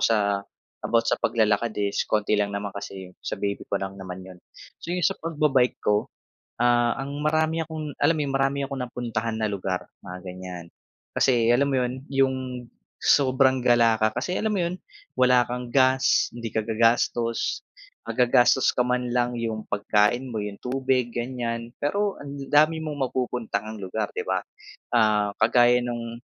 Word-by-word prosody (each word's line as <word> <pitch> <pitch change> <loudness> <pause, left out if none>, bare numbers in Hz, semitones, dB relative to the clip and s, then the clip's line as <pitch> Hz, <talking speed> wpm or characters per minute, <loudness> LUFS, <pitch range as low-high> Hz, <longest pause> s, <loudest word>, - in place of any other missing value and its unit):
sa 100 -3 +2 0.4
about 115 -1 +1
sa 115 - 0
paglalakad 110 0 +2
is 100 -1 -1
konti 105 0 +1
lang 105 -1 +2
naman 100 0 -4
kasi 95 -2 -8
sa - - -4
baby 100 0 -2
ko - - 0
lang 95 0 -5
naman 95 0 -7
'yon 90 -1 -12 0.4
so - - -10
yung 180 0 -1
sa - - +1
pagba-bike 150 -6 +1
ko 105 0 +2 0.5
ah, 120 -1 +3
ang 140 +3 -5
marami 155 +2 +1
akong 155 -2 -6
alam 165 - +4
mo - - -2
yun 140 - -3
marami 135 +1 +1
akong 135 -1 -5
napuntahan 115 -2 -3
na 110 - +1
lugar 95 -2 -2 0.2
mga 90 +1 -7
ganyan, 90 -1 -7 0.5
kasi 120 -3 +3
alam 140 +4 +3
mo - - +2
yun 125 0 -3 0.2
yung 135 -1 +2 0.7
sobrang 130 -1 +4
gala 115 -2 +4
ka 110 +1 +1
kasi 155 +9 -2
alam 220 0 0
mo - - +1
'yon 175 +2 -3 0.4
wala 125 -1 +5
kang 125 0 -4
gas 130 -1 +3
hindi 120 -1 -5
ka 110 - 0
gagastos 115 +1 +1 0.5
maggagastos 125 +2 +4
ka - - -2
man 125 -1 -1
lang 120 0 0
yung 115 -2 -4
pagkain 105 +5 +1
mo 110 - -2
'yong 105 -1 -5
tubig 130 -1 0
ganyan 120 -1 -3
pero 200 +7 0
ang 140 0 -7
dami 155 +2 +4
mong 150 -2 -5
mapupuntahang 110 -4 -3
ng - - -10
lugar 95 +4 -2
'di 450 - -2
ba - - 0 0.6
ah 105 -2 +3
kagaya 120 +2 +5
nung, 115 -1 -4
120 Hz, 170 wpm, -25 LUFS, 110-135 Hz, 0.7 s, wala